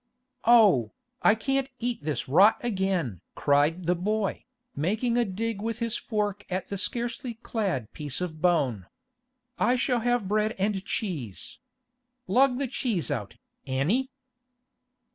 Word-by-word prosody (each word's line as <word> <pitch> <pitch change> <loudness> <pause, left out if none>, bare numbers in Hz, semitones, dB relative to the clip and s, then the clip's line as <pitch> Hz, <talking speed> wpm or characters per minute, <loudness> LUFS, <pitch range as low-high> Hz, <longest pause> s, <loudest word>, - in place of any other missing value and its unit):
'Oh, 205 - +5 0.3
I 215 - +5
can't 270 +3 -1
eat 240 -9 -3
this 150 -1 -2
rot 190 +11 +6
again!' 190 - -1
cried 150 +5 +2
the 175 - +3
boy, 200 +3 -1 0.3
making 220 - 0
a 240 - +4
dig 215 +1 -3
with 225 +1 -2
his 230 -1 -2
fork 205 -2 -2
at 185 0 -3
the 200 - -3
scarcely 240 +3 -3
clad 195 - -3
piece 145 -3 -4
of 160 -4 -4
bone. 130 - +1 0.7
'I 245 - +3
shall 250 -1 +1
have 245 -3 +1
bread 215 +2 +1
and 195 0 0
cheese. 155 - -4 0.7
Lug 250 +5 +3
the 280 - 0
cheese 230 - -1
out, - - -3 0.3
Annie! 170 - +1
205 Hz, 135 wpm, -27 LUFS, 165-235 Hz, 0.7 s, rot